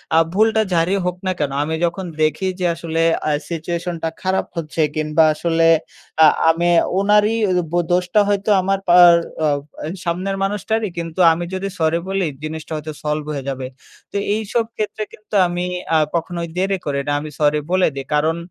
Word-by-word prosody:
আ -, -, +5 dB, 0.2 s
ভুলটা 220 Hz, +2 st, +3 dB
যারই 170 Hz, +4 st, +2 dB
হোক 180 Hz, 0 st, -1 dB
না -, -, +2 dB
কেন, 145 Hz, -2 st, -1 dB
আমি 160 Hz, +2 st, -2 dB
যখন 180 Hz, +3 st, -3 dB, 0.2 s
দেখি 155 Hz, +5 st, +1 dB
যে 180 Hz, -, 0 dB
আসলে 165 Hz, 0 st, -2 dB, 0.3 s
আ -, -, +2 dB, 0.2 s
সিচুয়েশনটা 170 Hz, 0 st, -3 dB
খারাপ 190 Hz, 0 st, 0 dB
হচ্ছে 160 Hz, 0 st, -2 dB
কিংবা 155 Hz, +1 st, +2 dB
আসলে 165 Hz, +1 st, +1 dB, 0.6 s
আ -, -, +9 dB, 0.2 s
আমি 170 Hz, +1 st, +2 dB, 0.3 s
ওনারই 210 Hz, +2 st, +3 dB
ওই 185 Hz, -, +1 dB
ও -, -, -6 dB
বো 175 Hz, -, +2 dB
দোষটা 180 Hz, +3 st, +2 dB
হয়তো 205 Hz, +1 st, 0 dB
আমার 195 Hz, +1 st, 0 dB
পার 175 Hz, -1 st, +8 dB, 0.3 s
আ -, -, +3 dB, 0.3 s
অ্যা 150 Hz, -, -4 dB, 0.2 s
সামনের 185 Hz, +3 st, -1 dB
মানুষটারই। 210 Hz, +2 st, -1 dB
কিন্তু 165 Hz, +1 st, -5 dB
আমি 170 Hz, +2 st, -2 dB
যদি 190 Hz, +1 st, -2 dB
সরি 160 Hz, +1 st, +2 dB
বলি 195 Hz, -1 st, 0 dB, 0.2 s
জিনিসটা 155 Hz, 0 st, -6 dB
হয়তো 155 Hz, 0 st, -6 dB
সলভ 150 Hz, 0 st, -2 dB
হয়ে 140 Hz, -2 st, -4 dB
যাবে। 130 Hz, -1 st, -4 dB, 0.5 s
তো -, -, -2 dB, 0.2 s
এইসব 220 Hz, +2 st, -1 dB
ক্ষেত্রে 215 Hz, 0 st, -3 dB
কিন্তু 215 Hz, 0 st, -18 dB
আমি 175 Hz, 0 st, -3 dB, 0.3 s
আ -, -, +6 dB, 0.2 s
কখনোই 170 Hz, 0 st, -2 dB
দেরি 195 Hz, +1 st, +1 dB
করি 140 Hz, -2 st, -1 dB
না, 145 Hz, -, 0 dB
আমি 150 Hz, +1 st, -7 dB
সরি 150 Hz, 0 st, +3 dB
বলে 185 Hz, 0 st, +3 dB
দেই। 135 Hz, -, -3 dB
কারণ 160 Hz, +3 st, +1 dB
170 Hz, 180 wpm, -19 LUFS, 160-195 Hz, 0.6 s, আ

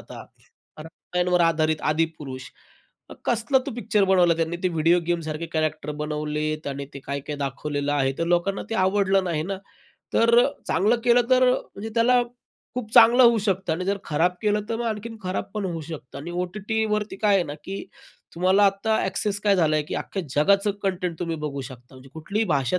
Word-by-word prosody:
आता -, -, -10 dB, 0.5 s
रामायणावर 180 Hz, +2 st, -1 dB
आधारित 155 Hz, -2 st, +2 dB
आदिपुरुष. 150 Hz, -5 st, -2 dB, 0.8 s
कसला 240 Hz, +3 st, +2 dB
तो 280 Hz, -, -2 dB
पिक्चर 210 Hz, -3 st, +1 dB
बनवला 180 Hz, -3 st, +4 dB
त्यांनी 165 Hz, +1 st, -1 dB
ते 185 Hz, -, +2 dB
व्हिडिओ 165 Hz, +1 st, +3 dB
गेमसारखे 165 Hz, -1 st, -2 dB
कॅरेक्टर 155 Hz, -1 st, -1 dB
बनवलेत 150 Hz, 0 st, -3 dB
आणि 140 Hz, 0 st, -4 dB
ते 140 Hz, -, -7 dB
काय 140 Hz, 0 st, -3 dB
काय 150 Hz, -, -3 dB
दाखवलेलं 145 Hz, +1 st, -2 dB
आहे. 135 Hz, -2 st, +1 dB
तर 165 Hz, -, 0 dB
लोकांना 175 Hz, +3 st, +1 dB
ते -, -, -1 dB
आवडलं 195 Hz, -1 st, +2 dB
नाही 160 Hz, -4 st, -1 dB
ना. 195 Hz, +3 st, -4 dB, 0.6 s
तर 235 Hz, +1 st, +5 dB, 0.2 s
चांगलं 210 Hz, +8 st, +3 dB
केलं 245 Hz, 0 st, +5 dB
तर 255 Hz, 0 st, +5 dB
म्हणजे 220 Hz, -3 st, -4 dB
त्याला 245 Hz, +1 st, +4 dB, 0.5 s
खूप 230 Hz, -3 st, -5 dB
चांगलं 235 Hz, +3 st, +8 dB
होऊ 235 Hz, -2 st, +6 dB
शकतं 195 Hz, -4 st, -1 dB
आणि 180 Hz, +3 st, -2 dB
जर 200 Hz, +1 st, 0 dB
खराब 170 Hz, +4 st, +1 dB
केलं 210 Hz, 0 st, +2 dB
तर 225 Hz, -, -1 dB
मग 240 Hz, -, -3 dB
आणखीन 225 Hz, +1 st, -4 dB
खराब 185 Hz, 0 st, -2 dB
पण 210 Hz, -2 st, -2 dB
होऊ 170 Hz, -3 st, -3 dB
शकतं. 145 Hz, -4 st, -8 dB
आणि 165 Hz, +5 st, -7 dB
ओ-टी-टी 200 Hz, +5 st, -2 dB
वरती 210 Hz, -2 st, -3 dB
काय 205 Hz, 0 st, +2 dB
आहे 185 Hz, -, +3 dB
ना, 145 Hz, -2 st, -6 dB
की 195 Hz, +1 st, -5 dB, 0.5 s
तुम्हाला 185 Hz, +4 st, +3 dB
आता 200 Hz, +3 st, +1 dB
एक्सेस 200 Hz, +1 st, -1 dB
काय 200 Hz, -2 st, +3 dB
झाला 155 Hz, -3 st, +3 dB
आहे, 150 Hz, -, +1 dB
की -, -, -6 dB
अख्ख्या 195 Hz, -, -4 dB
जगाचं 200 Hz, +8 st, +3 dB
कंटेंट 180 Hz, -3 st, -2 dB
तुम्ही 165 Hz, -2 st, -3 dB
बघू 140 Hz, -2 st, -3 dB
शकता. 125 Hz, -1 st, -13 dB
म्हणजे 130 Hz, +1 st, -14 dB
कुठलीही 200 Hz, +8 st, -2 dB
भाषा, 140 Hz, 0 st, +1 dB
180 Hz, 185 wpm, -24 LUFS, 155-205 Hz, 0.8 s, चांगलं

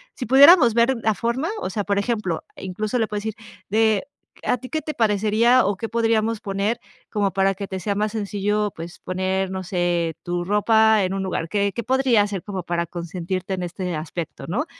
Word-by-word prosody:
sí 255 Hz, -, -4 dB
pudiéramos 270 Hz, -, +7 dB
ver 235 Hz, +3 st, +3 dB
la 220 Hz, -, +3 dB
forma" 235 Hz, -, -1 dB
o -, -, -2 dB
sea, 205 Hz, +2 st, -2 dB
por 200 Hz, 0 st, 0 dB
ejemplo, 205 Hz, -6 st, -2 dB
incluso 210 Hz, +5 st, -3 dB
le 225 Hz, -2 st, +1 dB
puedes 210 Hz, 0 st, -4 dB
decir 220 Hz, -1 st, -3 dB, 0.3 s
de: 220 Hz, +3 st, +2 dB, 0.4 s
"A -, -, +1 dB
ti 255 Hz, +2 st, -10 dB
qué 315 Hz, -, -2 dB
te 305 Hz, -, -5 dB
parecería 220 Hz, +3 st, +3 dB
o 200 Hz, +1 st, +1 dB
qué 225 Hz, +4 st, -5 dB
podríamos 225 Hz, -1 st, +1 dB
poner 200 Hz, +3 st, -1 dB, 0.3 s
como 205 Hz, -3 st, 0 dB
para 195 Hz, 0 st, +2 dB
que 200 Hz, +1 st, -5 dB
te 190 Hz, -1 st, -5 dB
sea 200 Hz, +3 st, -2 dB
más 210 Hz, +1 st, -1 dB
sencillo, 210 Hz, 0 st, -1 dB
pues 165 Hz, +1 st, -8 dB
poner, 190 Hz, +1 st, -2 dB
no 190 Hz, 0 st, -4 dB
sé 175 Hz, -2 st, -1 dB
tu 175 Hz, 0 st, -2 dB
ropa 220 Hz, +1 st, +4 dB
en 185 Hz, 0 st, -1 dB
un 195 Hz, 0 st, -2 dB
lugar. 175 Hz, -3 st, -3 dB
¿Qué 200 Hz, 0 st, 0 dB
qué 235 Hz, -, -4 dB
podría 255 Hz, -2 st, +3 dB
hacer 205 Hz, -2 st, -2 dB
como 190 Hz, -3 st, -5 dB
para 170 Hz, 0 st, -1 dB
consentirte 180 Hz, +2 st, -4 dB
en 180 Hz, -, -4 dB
este 180 Hz, 0 st, -4 dB
aspecto, 160 Hz, +1 st, -6 dB
¿no?" 225 Hz, -, -1 dB
205 Hz, 205 wpm, -22 LUFS, 185-225 Hz, 0.4 s, pudiéramos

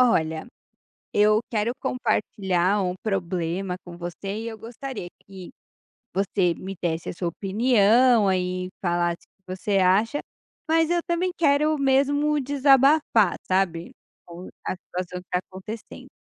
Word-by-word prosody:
Olha, 160 Hz, -10 st, +2 dB, 0.7 s
eu 210 Hz, +1 st, +4 dB
quero 225 Hz, +1 st, 0 dB
compartilhar 200 Hz, -5 st, 0 dB
um 180 Hz, 0 st, -1 dB
problema 185 Hz, -2 st, -2 dB
com 175 Hz, -1 st, -10 dB
você, 180 Hz, +4 st, -5 dB
e 225 Hz, -, -5 dB
eu 225 Hz, -1 st, -6 dB
gostaria 235 Hz, -2 st, -7 dB, 0.2 s
que 190 Hz, -2 st, -11 dB, 0.6 s
você 190 Hz, -2 st, +1 dB
me 190 Hz, +3 st, -7 dB
desse 165 Hz, -2 st, -2 dB
a -, -, -5 dB
sua 175 Hz, 0 st, -3 dB
opinião 220 Hz, +3 st, +3 dB
e 180 Hz, 0 st, -2 dB
falasse 175 Hz, -1 st, 0 dB
o -, -, -
que 185 Hz, 0 st, -7 dB
você 195 Hz, +1 st, 0 dB
acha, 205 Hz, +9 st, +3 dB, 0.5 s
mas 325 Hz, 0 st, +3 dB
eu 345 Hz, 0 st, +2 dB
também 350 Hz, +1 st, 0 dB
quero 300 Hz, -1 st, +3 dB
mesmo 285 Hz, +2 st, +2 dB
desabafar, 275 Hz, -, +4 dB
sabe, 180 Hz, -3 st, 0 dB, 0.3 s
com 175 Hz, +1 st, -10 dB, 0.2 s
a -, -, 0 dB
situação 180 Hz, 0 st, -6 dB
que 180 Hz, -, -21 dB
está 180 Hz, -, +1 dB
acontecendo. 190 Hz, +4 st, -9 dB
195 Hz, 135 wpm, -24 LUFS, 180-255 Hz, 0.7 s, eu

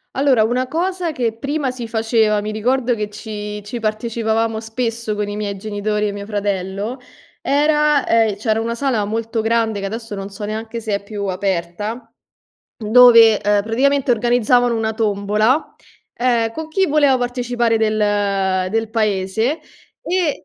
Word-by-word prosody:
Allora, 265 Hz, -4 st, +3 dB
una 250 Hz, +3 st, 0 dB
cosa 350 Hz, +2 st, -2 dB
che 240 Hz, -5 st, 0 dB
prima 280 Hz, 0 st, -2 dB
si 245 Hz, -2 st, -7 dB
faceva, 220 Hz, -2 st, +1 dB
mi 210 Hz, +1 st, -4 dB
ricordo 245 Hz, +3 st, 0 dB
che 210 Hz, -1 st, -3 dB
ci 210 Hz, 0 st, -6 dB
ci 225 Hz, +4 st, -6 dB
partecipavamo 220 Hz, 0 st, -1 dB
spesso 225 Hz, -1 st, -3 dB
con 210 Hz, 0 st, -2 dB
i 205 Hz, -, -5 dB
miei 205 Hz, -1 st, -3 dB
genitori 210 Hz, +1 st, -2 dB
e -, -, -3 dB
mio 200 Hz, 0 st, -7 dB
fratello, 205 Hz, +3 st, -3 dB, 0.4 s
era 300 Hz, 0 st, +2 dB
ehm, 225 Hz, -3 st, +2 dB
c'era 220 Hz, +1 st, 0 dB
una 230 Hz, +1 st, -2 dB
sala 235 Hz, -5 st, 0 dB
molto 225 Hz, +2 st, -3 dB
grande 225 Hz, -1 st, 0 dB
che 195 Hz, -, -4 dB
adesso 225 Hz, +2 st, -6 dB
non 195 Hz, -1 st, -5 dB
so 200 Hz, +1 st, -9 dB
neanche 220 Hz, +2 st, -4 dB
se 215 Hz, -2 st, -1 dB
è 200 Hz, -, -4 dB
più 200 Hz, 0 st, -5 dB
aperta, 195 Hz, +5 st, -3 dB, 0.6 s
dove, 230 Hz, -1 st, +7 dB
ehm, 205 Hz, 0 st, +1 dB
praticamente 265 Hz, +4 st, +1 dB
organizzavano 245 Hz, +1 st, +2 dB
una 220 Hz, -1 st, -1 dB
tombola, 215 Hz, +5 st, +1 dB, 0.4 s
ehm, 235 Hz, -2 st, +1 dB
co' 315 Hz, +6 st, -6 dB
chi 380 Hz, +4 st, +1 dB
voleva 285 Hz, -3 st, +3 dB
partecipare 245 Hz, -1 st, 0 dB
del 215 Hz, -1 st, +1 dB, 0.7 s
del 225 Hz, +1 st, -1 dB
paese, 220 Hz, -, 0 dB, 0.4 s
e 350 Hz, -4 st, -1 dB
225 Hz, 155 wpm, -19 LUFS, 210-245 Hz, 0.7 s, dove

